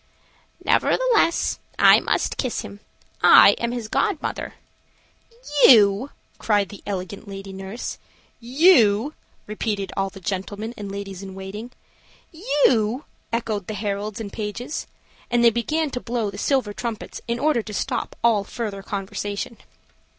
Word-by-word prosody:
"Nevertheless 470 -9 +2 0.2
I - - +7
must - - -1
kiss 255 -3 -2
him. 200 - -10 0.4
I - - +9
am 235 0 -1
his 240 -3 -4
god 395 - 0
mother." - - -5 1.1
"You!" 210 +1 +6 0.3
cried 205 -3 +1
the 205 - -11
elegant 195 +1 -5
lady 195 0 -8
nurse. 195 +5 -6 0.4
"You!" 250 - +4 0.3
repeated 210 -2 -3
all 195 0 0
the 195 - -12
gentlemen 205 +4 -4
and 205 -2 -7
ladies 195 -1 -6
in 190 -1 -9
waiting. 195 +5 -7 0.6
"You!" 270 - +1 0.3
echoed 220 -4 -2
the 215 - -4
heralds 205 0 -3
and 210 -3 -6
pages 220 +6 -5 0.4
and 240 0 +2
they 235 - +7
began 300 +7 -1
to 250 - -3
blow 235 -4 -2
the 200 - -8
silver 260 -6 0
trumpets 230 0 -5
in 235 0 -1
order 290 -2 +2
to 215 - -9
stop 245 +4 -3
all 225 -4 +4
further 205 -2 -5
conversation. 200 +3 -4
215 Hz, 135 wpm, -23 LUFS, 200-240 Hz, 1.1 s, I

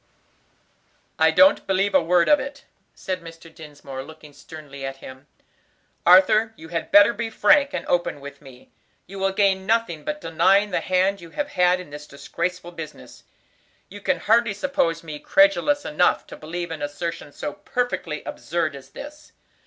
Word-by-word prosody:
"I - - +5
don't 285 +1 +4
believe 195 +1 +1
a 190 - +5
word 170 +1 +2
of 295 - +5
it," 275 +1 -8 0.3
said 185 -1 -4
Mr. 165 0 -13
Dinsmore, 145 -4 -9
looking 155 +1 -13
sternly 145 -3 -11
at 135 0 -5
him. 130 +1 -12 0.8
"Arthur, 215 +5 +5
you 160 +1 -12
had 165 -1 -4
better 205 +3 +7
be 230 -1 -4
frank 285 +4 +3
and - - -4
open 175 -4 -1
with 140 0 -11
me. 130 -3 -16 0.3
You 195 +1 -10
will 195 0 +1
gain 190 -1 +1
nothing 220 -9 0
by 300 - -2
denying 195 - +2
the - - 0
hand 185 +1 +1
you 170 - -11
have 290 - -4
had 180 -5 +2
in 180 -5 -11
this 150 0 -9
disgraceful 175 +5 -5
business. 165 -3 -11 0.6
You 205 +1 -11
can 275 +6 0
hardly 225 -1 +2
suppose 200 - -1
me 155 -2 -7
credulous 295 - +3
enough 180 +4 +1
to - - -11
believe 170 +2 -6
an 160 -2 -6
assertion 145 +1 -5
so 145 - -6
perfectly 195 -7 -3
absurd 160 -2 -3
as 135 -1 -12
this. 300 - -11
180 Hz, 170 wpm, -23 LUFS, 155-205 Hz, 0.8 s, better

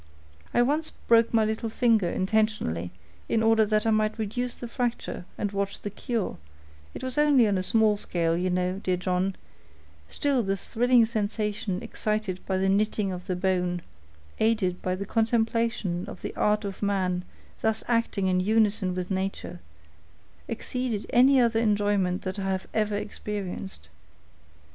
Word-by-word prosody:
I 240 - +4
once 300 +5 0
broke 230 0 +3
my 225 -2 +3
little 220 +1 -2
finger 220 -5 +2
intentionally, 190 - 0 0.4
in 225 -1 +2
order 225 0 +5
that 215 0 +1
I 225 - +3
might 215 0 +1
reduce 240 +3 -2
the 240 - -7
fracture 240 -6 -3
and 205 - -2
watch 200 0 -2
the 205 - -5
cure: 230 -1 -3 0.6
it - - -7
was 260 +2 -2
only 285 -6 +5
on 205 - +1
a 185 - +1
small 215 +1 +3
scale, 165 -4 0
you 180 +2 0
know, 180 +1 0
dear 185 -2 0
John; 185 +1 0 0.7
still 280 -3 +1
the 195 -2 -1
thrilling 240 +4 +3
sensation 210 -3 -2
excited 215 -4 -2
by 190 - +1
the 190 +1 +1
knitting 205 0 +1
of 180 0 -7
the 185 - -1
bone, 180 -1 0 0.6
aided 215 -5 +1
by 185 0 -1
the 200 +2 -5
contemplation 225 -4 0
of - - -10
the - - -5
art 210 0 +1
of 195 -1 -6
man 185 -3 0 0.4
thus 220 0 0
acting 230 -4 +1
in 185 -1 +2
unison 205 -2 +2
with 180 +1 -4
nature, 190 - -3 0.9
exceeded 250 -5 -3
any 260 +2 +6
other 230 -2 +3
enjoyment 205 -4 +1
that 190 +1 -4
I 195 0 -2
have 190 0 -1
ever 215 -1 +1
experienced. 195 - -5
210 Hz, 160 wpm, -27 LUFS, 185-225 Hz, 0.9 s, any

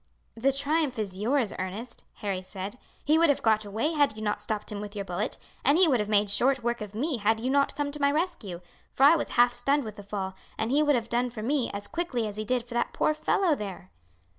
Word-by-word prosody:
"The 255 +4 +2
triumph 280 0 0
is 195 -3 -4
yours, 235 0 +1
Ernest," 210 +6 -6
Harry 195 -3 -3
said. 195 +5 -7 0.3
"He 310 +2 +4
would 335 -1 +5
have 285 - +1
got 220 -1 +3
away 220 +10 -1
had 290 -8 +2
you 215 - -7
not 210 -1 -1
stopped 210 0 -4
him 205 -1 -4
with 210 0 -8
your 200 -1 -3
bullet, 180 +3 -3 0.3
and 285 +4 +4
he 365 -1 +6
would 260 -6 +3
have 210 0 -2
made 205 -1 +3
short 260 +4 +3
work 235 0 -1
of 210 -1 -7
me 275 +4 -1
had 220 +1 +1
you 255 +3 -1
not 280 0 +2
come 290 -1 -2
to 295 0 -7
my 280 0 +4
rescue, 290 - -2 0.3
for 270 - 0
I 295 +4 +8
was 320 - -2
half 240 0 +6
stunned 275 +4 +1
with 215 -2 -8
the - - -7
fall, 195 -1 -4 0.2
and 220 +2 -1
he 290 +3 +4
would 295 -2 +4
have 235 -2 -1
done 240 +2 0
for 225 -3 -7
me 270 0 +1
as 200 0 -4
quickly 255 -4 -2
as 210 0 -6
he 215 - -3
did 245 +1 0
for 240 - -8
that 240 0 -1
poor 305 - +2
fellow 315 +3 +2
there." 195 - -6
235 Hz, 255 wpm, -28 LUFS, 210-280 Hz, 0.3 s, I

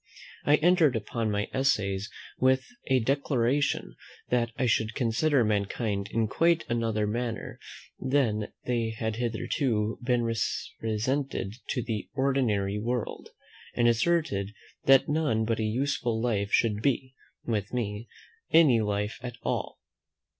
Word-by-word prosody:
I 145 - +6
entered 160 -4 +4
upon 110 +1 -2
my 105 0 -1
Essays 105 -7 +1 0.3
with 130 +1 +3 0.2
a 130 -2 +3
declaration 135 +1 0 0.4
that 120 -1 +2
I 130 - +1
should 110 -2 +1
consider 125 +3 +2
mankind 105 -1 -1
in 115 -1 +1
quite 165 +7 +2
another 115 -3 0
manner 115 +1 -3 0.4
than 120 -6 0
they 115 -2 -1
had 110 -1 -2
hitherto 115 -1 -1
been 120 -1 +1
represented 115 0 -2
to 125 - -1
the 110 -3 -4
ordinary 115 -8 +1
world, 120 +1 -3 0.5
and 120 - +3
asserted 115 - +1 0.3
that 135 -1 +6
none 145 -8 +1
but 115 0 0
a - - 0
useful 120 0 0
life 105 -4 0
should 105 -2 +2
be, 130 0 0 0.3
with 105 -4 -2
me, 115 -2 -3 0.4
any 145 -9 +6
life 105 0 -2
at 120 -1 -6
all. - - -3
115 Hz, 125 wpm, -28 LUFS, 110-130 Hz, 0.5 s, I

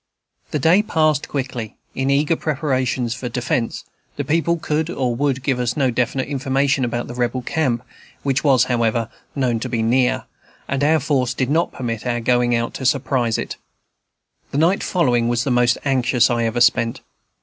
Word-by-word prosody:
The - - -1
day 165 +8 +4
passed 155 -8 +1
quickly, 130 -5 -4 0.2
in 135 +1 -1
eager 145 +4 +2
preparations 130 -6 -1
for 125 -1 -5
defence; 120 -1 -2 0.3
the - - -2
people 170 +2 +1
could 155 0 -1
or 130 -8 -1
would 135 0 0
give 135 -3 0
us 125 +1 -1
no 135 -3 +2
definite 125 +2 -1
information 135 0 0
about 120 0 -2
the - - -8
Rebel 125 +1 -1
camp, 125 -5 0 0.4
which 135 0 0
was, 135 -5 +5
however, 115 -2 0 0.3
known 125 -5 0
to - - -4
be 115 -2 -1
near, 125 +2 +2 0.4
and 140 +1 -1
our 155 +2 +4
force 130 -4 0
did 130 +1 -1
not 165 +3 +2
permit 115 -1 -4
our 120 -1 0
going 120 +1 +2
out 115 0 -1
to 130 - -6
surprise 130 -4 +1
it. - - -5 0.9
The - - -3
night 170 +6 +3
following 125 -10 +1
was 120 0 +1
the 135 - -1
most 125 0 +3
anxious 125 -2 +2
I 120 -1 +1
ever 115 +2 -1
spent. 115 -2 +3
130 Hz, 180 wpm, -20 LUFS, 120-140 Hz, 0.9 s, was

